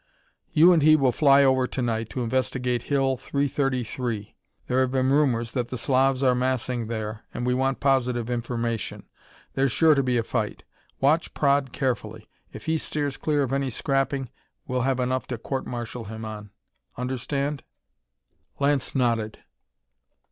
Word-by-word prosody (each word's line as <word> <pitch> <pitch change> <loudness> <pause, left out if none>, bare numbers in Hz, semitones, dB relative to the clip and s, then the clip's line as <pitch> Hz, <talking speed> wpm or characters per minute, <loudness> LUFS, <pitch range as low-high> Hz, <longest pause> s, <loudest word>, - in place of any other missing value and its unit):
"You 170 +4 +7
and 165 - +3
he 155 +1 +7
will 135 -4 +3
fly 140 +1 +5
over 130 -1 +3
to - - -5
night 115 -2 -1
to 125 - -3
investigate 125 0 0
Hill 135 -1 +1
333. 130 -5 -2 0.3
There 125 - +1
have 130 - +2
been 130 0 +1
rumors 125 -6 +2
that 125 -3 -2
the 125 - -4
Slavs 130 +2 +2
are 130 -1 +5
massing 125 -2 -1
there, 110 -1 -4
and 120 - -2
we 125 - +2
want 135 +1 0
positive 125 -4 +1
information. 120 -1 -3 0.5
There's 135 -1 +1
sure 160 +5 +5
to 140 - +2
be 125 -2 +1
a 115 - +1
fight. - - -3 0.4
Watch 155 +5 +2
Praed 140 -2 +2
carefully. 110 -5 -3 0.2
If - - -10
he 160 0 +1
steers 145 -3 -2
clear 150 -2 0
of 135 0 -2
any 135 -1 0
scrapping, 135 +1 -1 0.3
well 125 -1 -1
have 130 +1 0
enough 130 +1 -1
to 120 - -4
court 135 +4 -4
martial 120 -1 -5
him 110 +2 -7
on. 105 -1 -7 0.5
Understand?" 140 +3 -2 1.0
Lance 140 -1 +1
nodded. 115 -4 0
130 Hz, 160 wpm, -25 LUFS, 120-135 Hz, 1.0 s, You